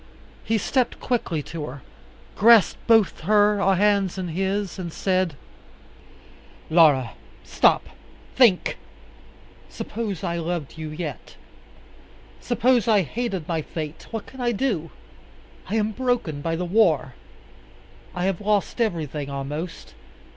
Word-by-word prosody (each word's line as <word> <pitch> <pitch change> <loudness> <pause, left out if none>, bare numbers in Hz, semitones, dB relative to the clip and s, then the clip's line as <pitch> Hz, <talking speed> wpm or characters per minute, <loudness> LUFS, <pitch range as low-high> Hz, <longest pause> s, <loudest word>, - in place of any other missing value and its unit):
He 225 - +1
stepped 250 +4 0
quickly 180 - -1
to 155 -1 -6
her, 130 +1 -9 0.5
grasped 225 -4 +5
both 225 -4 +4
her 205 +2 +3
hands 200 -1 +2
in 185 -2 -3
his, 195 +3 -2
and 175 -2 -5
said, 185 -3 0 1.4
"Laura, 150 -7 +5 0.3
stop! - - +3 0.5
think! 230 -8 +3 0.9
Suppose 210 -6 -5
I 170 - -1
loved 170 -3 -4
you 160 -1 -6
yet! 155 +3 -7 1.0
Suppose 245 -1 +2
I 210 -4 +4
hated 195 -3 -4
my 165 -2 -1
fate! 155 0 -7
What 225 -2 -5
can 265 - -10
I 240 -1 +1
do? 200 - -1 0.8
I 210 - -1
am 215 0 +1
broken 240 - -1
by 165 +2 -1
the 180 +2 -3
war. 170 - +2 1.0
I 180 - -2
have 190 -1 -1
lost 210 +3 0
everything 155 - -2
almost. 145 +5 -6
185 Hz, 120 wpm, -24 LUFS, 160-215 Hz, 1.4 s, grasped